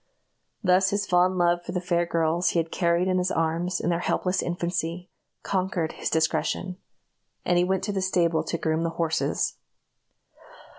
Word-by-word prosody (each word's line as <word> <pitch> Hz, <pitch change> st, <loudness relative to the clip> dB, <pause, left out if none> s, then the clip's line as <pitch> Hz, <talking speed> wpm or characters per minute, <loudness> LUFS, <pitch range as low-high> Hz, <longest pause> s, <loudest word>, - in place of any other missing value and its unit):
Thus 185 Hz, 0 st, +4 dB
his 205 Hz, +1 st, -1 dB
fond 180 Hz, 0 st, +3 dB
love 175 Hz, 0 st, +2 dB
for -, -, -6 dB
the 180 Hz, -, 0 dB
fair 175 Hz, -1 st, 0 dB
girls 165 Hz, +1 st, +1 dB
he 170 Hz, -, +1 dB
had 165 Hz, 0 st, -2 dB
carried 170 Hz, 0 st, +1 dB
in 185 Hz, -1 st, +2 dB
his 180 Hz, 0 st, 0 dB
arms 165 Hz, +3 st, 0 dB
in 175 Hz, -, 0 dB
their 170 Hz, -, 0 dB
helpless 180 Hz, +1 st, 0 dB
infancy, 175 Hz, 0 st, -3 dB, 0.3 s
conquered 185 Hz, -4 st, -1 dB
his -, -, -4 dB
discretion; 160 Hz, +3 st, 0 dB, 0.7 s
and 175 Hz, 0 st, +3 dB
he -, -, +3 dB
went 190 Hz, +1 st, 0 dB
to 205 Hz, -, -1 dB
the 195 Hz, -1 st, -1 dB
stable 170 Hz, -3 st, +1 dB
to 170 Hz, -, -2 dB
groom 160 Hz, 0 st, 0 dB
the 165 Hz, -, 0 dB
horses. 165 Hz, -2 st, 0 dB
175 Hz, 175 wpm, -26 LUFS, 165-185 Hz, 0.7 s, Thus